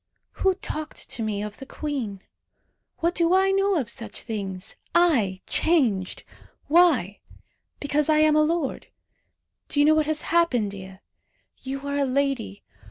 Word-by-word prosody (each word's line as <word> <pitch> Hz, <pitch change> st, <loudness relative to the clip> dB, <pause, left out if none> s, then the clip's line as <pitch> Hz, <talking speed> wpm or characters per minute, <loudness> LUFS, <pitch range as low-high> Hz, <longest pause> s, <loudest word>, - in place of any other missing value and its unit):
"Who 380 Hz, -1 st, +3 dB
talked 310 Hz, -4 st, -5 dB
to -, -, -1 dB
me 210 Hz, -2 st, -2 dB
of 210 Hz, 0 st, -7 dB
the 270 Hz, -, -9 dB
queen? 250 Hz, -12 st, -5 dB, 0.8 s
What 340 Hz, +1 st, +1 dB
do 340 Hz, +1 st, +2 dB
I 385 Hz, +1 st, +3 dB
know 390 Hz, 0 st, +2 dB
of 275 Hz, -9 st, -1 dB
such 230 Hz, -2 st, -4 dB
things? 195 Hz, -5 st, -4 dB, 0.2 s
I 235 Hz, -, +3 dB
changed! 235 Hz, -, +1 dB, 0.4 s
Why? 290 Hz, -, +3 dB, 0.6 s
Because 290 Hz, +1 st, 0 dB
I 310 Hz, -, +4 dB
am 305 Hz, 0 st, +4 dB
a 305 Hz, -, +5 dB
lord. 310 Hz, -2 st, -1 dB, 0.8 s
Do 290 Hz, -, -1 dB
you 290 Hz, -, +6 dB
know 310 Hz, -, +6 dB
what 310 Hz, -1 st, +2 dB
has 310 Hz, -1 st, +1 dB
happened, 250 Hz, -12 st, +2 dB
Dea? 190 Hz, -1 st, -10 dB, 0.6 s
You 270 Hz, +1 st, -5 dB
are 280 Hz, 0 st, -2 dB
a 280 Hz, -, +2 dB
lady. 265 Hz, -6 st, -1 dB
280 Hz, 155 wpm, -24 LUFS, 215-320 Hz, 0.8 s, you